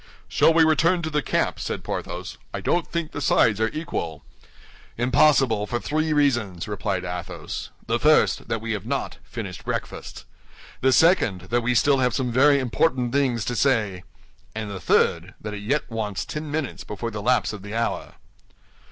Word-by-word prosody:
"Shall - - +4
we 165 0 +5
return 165 +3 +3
to 160 - -3
the 150 0 +1
camp?" - - 0
said - - -4
Porthos. - - -5 0.2
"I - - -3
don't 175 -1 0
think 170 -2 -3
the 145 - -5
sides 110 -4 +3
are 110 - +2
equal." 115 - -4 0.7
"Impossible, 125 -3 +3
for 120 - -2
three 155 +4 -1
reasons," 120 - +1
replied 100 -3 -2
Athos. 90 -1 -5 0.2
"The - - 0
first, - - +3
that 115 -1 -2
we 115 0 -3
have 105 -3 -4
not - - -3
finished 95 -5 -7
breakfast; - - -5 0.6
the 130 - +4
second, 130 - +4
that 120 0 +2
we 125 +1 0
still 140 +3 +4
have 125 -2 +1
some 130 -2 -1
very 140 +4 +5
important 130 -1 0
things 130 -6 +1
to 120 - -2
say; 110 -9 +1 0.5
and 110 -2 -4
the 95 - -5
third, - - +1
that 105 -1 -6
it 100 - -6
yet 140 +9 -1
wants 110 -4 -3
ten 150 0 -5
minutes 150 -3 -3
before 115 +2 -5
the 105 -1 -5
lapse 125 0 +2
of 105 - -7
the 105 +2 -7
hour." 115 0 -2
120 Hz, 180 wpm, -24 LUFS, 105-145 Hz, 0.7 s, we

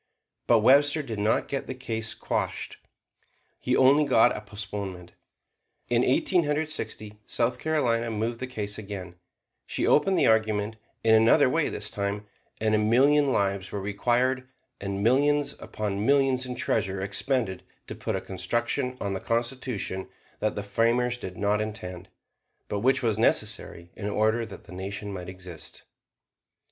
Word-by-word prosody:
But 115 -2 +5
Webster 145 +5 +5
did 115 -6 -5
not 105 +2 +1
get 140 - -3
the 130 - -4
case 110 -4 -4
quashed: - - -3 0.8
he - - 0
got - - +2
only 140 +3 +5
a 120 -4 +4
postponement. 100 -3 -6 0.8
In 120 0 +3
Eighteen 170 +7 +2
Hundred 150 +1 0
Sixty, 105 -8 -5
South 120 +1 0
Carolina 120 -7 +1
moved 115 +2 -2
the 130 - -4
case 105 -4 -4
again; 95 -4 -7 0.5
she - - -1
opened 190 +5 +4
the - - +4
argument 110 -1 +2 0.3
in 110 - +5
another 115 +5 +6
way 155 +4 +1
this 105 - -5
time, 100 0 -3 0.3
and 110 0 +1
a 105 - +4
million 135 +6 +4
lives 100 -3 0
were 100 - -3
required, 120 +6 0 0.3
and 100 0 -3
millions 145 +5 +3
upon 105 -1 -3
millions 135 0 +3
in 125 - -4
treasure 95 -5 0
expended 100 0 -1 0.2
to - - -6
put - - -3
a - - -2
construction 120 +7 -2
on 100 -1 -2
the 95 - -2
Constitution 115 -5 -2 0.3
that 110 - 0
the 105 - -3
framers 115 +4 +1
did 95 -7 -7
not 105 +1 +1
intend; 95 -4 -6 0.6
but 105 - -2
which 130 +4 +2
was 110 -2 +1
necessary 85 -6 0
in 105 -1 -4
order 110 +2 +1
that 95 -3 -11
the - - -13
Nation 100 +2 -5
might 90 -2 -6
exist. 90 -3 -9
110 Hz, 155 wpm, -27 LUFS, 100-130 Hz, 0.8 s, another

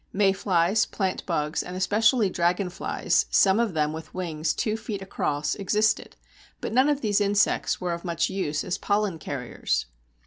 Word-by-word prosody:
Mayflies, 195 0 +2
plantbugs, 170 -5 -2
and 180 - -7
especially 215 +4 +3
dragonflies 180 0 0
(some 195 +2 +4
of 225 -7 0
them 150 0 +1
with 160 0 -9
wings 160 -4 -2
two 215 -1 -1
feet 215 -2 -5
across) 150 -6 -2
existed, 210 +2 0 0.4
but - - -4
none 260 +4 +4
of 290 -1 0
these 210 -2 +1
insects 205 0 +2
are 180 -1 -2
of 170 - -6
much 170 -1 0
use 155 -6 -2
as 185 - -3
pollen 205 -5 0
carriers. 135 -5 -2
190 Hz, 150 wpm, -26 LUFS, 170-210 Hz, 0.4 s, some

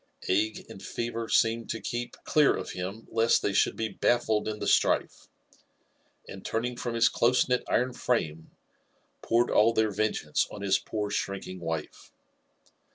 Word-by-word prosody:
Ague 105 +3 0
and 95 - -11
fever 115 -1 -4
seemed 115 0 +2
to 115 - -3
keep 120 +1 -4 0.2
dear 150 -2 +5
of - - -5
him 95 +5 -6
lest 115 0 +3
they 100 - 0
should 95 - +2
be 110 - -2
baffled 110 0 +1
in 110 0 -3
the - - -5
strife, - - +1 1.0
and 95 - -9
turning 120 +2 -2
froih 120 -1 -4
bfii 115 - +4
cl6se*kntf 125 +1 +2
iron 125 +1 +1
frame, 80 -12 -2 0.7
poured 120 +1 +2
all 115 +2 +4
their 110 -1 +2
vengeatteeon 100 -2 -1
his 95 -1 +3
poor 105 -1 -4
shrink 100 -1 -2
ing 95 0 -8
wife. 80 -2 -5
110 Hz, 155 wpm, -28 LUFS, 100-120 Hz, 1.0 s, dear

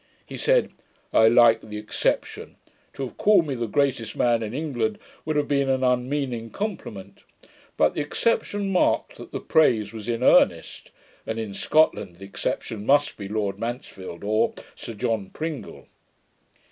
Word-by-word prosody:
He - - -9
said, - - +2 0.4
'I 110 - +6
like 115 -1 +6
the 105 -1 -8
exception: 105 0 -2 0.4
to 135 - -5
have 130 - -7
called 200 -5 +4
me 145 - -3
the 120 -2 -3
greatest 120 -3 0
man 120 -1 +2
in 110 -1 -4
England, 120 -6 -2 0.3
would 155 0 -1
have 150 -1 +1
been 140 -1 +1
an 130 0 +1
unmeaning 125 -2 -1
compliment: 105 - -6 0.6
but 75 - +3
the - - -2
exception 205 +4 -1
marked 185 - +1
that - - -11
the - - -4
praise 120 -9 +2
was 110 0 -7
in 120 +1 -1
earnest; - - +3 0.4
and, 110 - -3
in 110 -3 -4
SCOTLAND, 105 - +2
the 95 +3 -11
exception 100 +2 -4
must 145 +4 +3
be 100 - -7
LORD 100 -1 -2
MANSFIELD, 100 -7 -6
or 110 +2 +1 0.2
SIR 115 - -8
JOHN 110 -3 -2
PRINGLE.' 155 -4 -6
120 Hz, 160 wpm, -24 LUFS, 110-145 Hz, 0.6 s, I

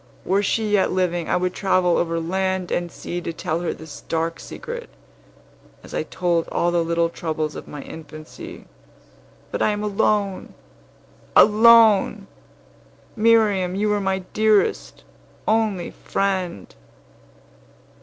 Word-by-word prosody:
Were 195 +2 +2
she 215 +1 0
yet 205 -2 +3
living, 175 -2 -1
I - - +2
would 180 0 -1
travel 185 -3 +2
over 165 -1 0
land 185 +2 -2
and 175 -1 -1
sea 175 0 -5
to 170 - -4
tell 160 0 -3
her 175 - -2
this 160 -2 -10
dark 165 0 -2
secret, 475 0 -8 0.9
as - - -12
I - - 0
told 175 -2 -1
all 175 - 0
the 170 -1 +1
little 170 0 +1
troubles 155 -2 -3
of - - -8
my 145 - -8
infancy. 160 - -10 0.9
But - - -3
I - - +3
am 210 0 -2
alone 205 -1 0 0.8
alone! 215 -2 +6 0.9
Miriam, 215 -5 +3
you 210 +2 0
were 205 -1 +1
my 190 -1 -1
dearest, 215 -1 +1 0.4
only 215 -5 +1
friend. 185 - -3
185 Hz, 130 wpm, -22 LUFS, 170-210 Hz, 0.9 s, alone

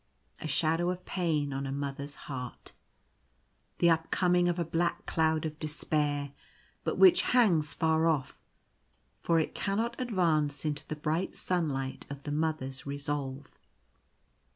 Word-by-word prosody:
A - - -4
shadow 165 +4 +2
of 180 0 -4
pain 155 -6 0
on 135 0 -3
a - - -3
Mother's 140 +1 -4
heart. 125 -3 -7 1.1
The 170 -1 +5
upcoming 175 +2 +2
of 175 - 0
a 170 - 0
black 170 +2 -1
cloud 160 -1 +1
of 155 0 -5
despair, 150 -2 -1 0.5
but - - -1
which 360 -2 +7
hangs 175 -12 +3
far 160 0 +2
off 150 -5 -1 0.4
— - - -42
for 165 -1 +3
it 160 - -1
cannot 225 +5 -1
advance 160 - +1
into 145 -1 -2
the 155 - -3
bright 155 +5 -1
sunlight 145 -7 -2
of 140 0 -7
the 145 - -4
Mother's 150 -4 -2
resolve. 140 -1 -4
155 Hz, 140 wpm, -30 LUFS, 145-170 Hz, 1.1 s, which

